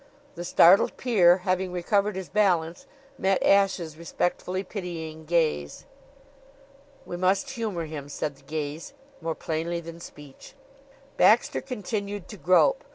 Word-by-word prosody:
The 175 - -7
startled 175 +2 +5
peer, 185 -8 +4
having 185 0 0
recovered 200 +3 0
his 190 -2 -5
balance, 180 +1 0 0.3
met 190 0 +1
Ashe's 190 -5 +2
respectfully 180 +2 -2
pitying 165 -5 -7
gaze. 155 - -1 1.2
"We 175 - -6
must 190 +9 +1
humor 215 -9 -3
him," 150 -2 -7
said 145 0 -4
the - - -21
gaze, 155 - -5 0.3
more 165 0 -3
plainly 165 +2 -3
than 165 0 -10
speech. 145 - -13 0.6
Baxter 225 +3 +4
continued 205 -5 -5
to 210 - -9
grope. 195 - +3
175 Hz, 125 wpm, -26 LUFS, 160-200 Hz, 1.2 s, startled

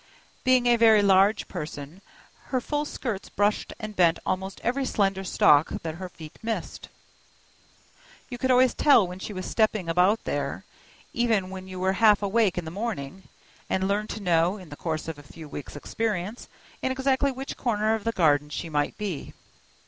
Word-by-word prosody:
Being 255 -1 +4
a 240 -1 +5
very 220 -2 +6
large 200 +2 +4
person, 150 +3 -7 0.4
her 260 - -1
full 295 +4 -2
skirts 225 -8 -5
brushed 205 +1 0
and 215 -1 -6
bent 170 -3 +4
almost 190 +1 -3
every 265 +3 0
slender 195 -6 0
stalk 150 -4 +4
that 160 -1 -3
her 185 - -5
feet 155 -3 -12
missed. 225 0 -4 1.4
You 245 -2 -7
could 260 - 0
always 255 0 +5
tell 255 -10 +5
when 180 +1 -8
she 200 - -6
was 185 -2 -5
stepping 215 -5 +1
about 180 +6 +3
there, - - -3 0.5
even 220 -6 +1
when 190 0 -8
you 185 -1 -7
were 190 +1 +1
half 210 -2 +6
awake 200 -2 +2
in 175 - -2
the 160 - -6
morning, 190 -5 -5 0.4
and 190 0 0
learned 210 +2 -1
to 215 - -6
know, 175 +2 +2
in 185 -5 -12
the 145 - -8
course 155 0 -3
of 160 -3 -6
a - - -10
few 155 +2 -12
weeks' 145 0 -8
experience, 210 +6 -3 0.3
in 260 - 0
exactly 265 +1 +1
which 265 +1 -6
corner 220 -3 0
of 220 -2 -2
the 230 - 0
garden 150 -7 +2
she 165 +3 -5
might 145 -1 -1
be. 195 -8 -5
195 Hz, 180 wpm, -26 LUFS, 175-230 Hz, 1.4 s, very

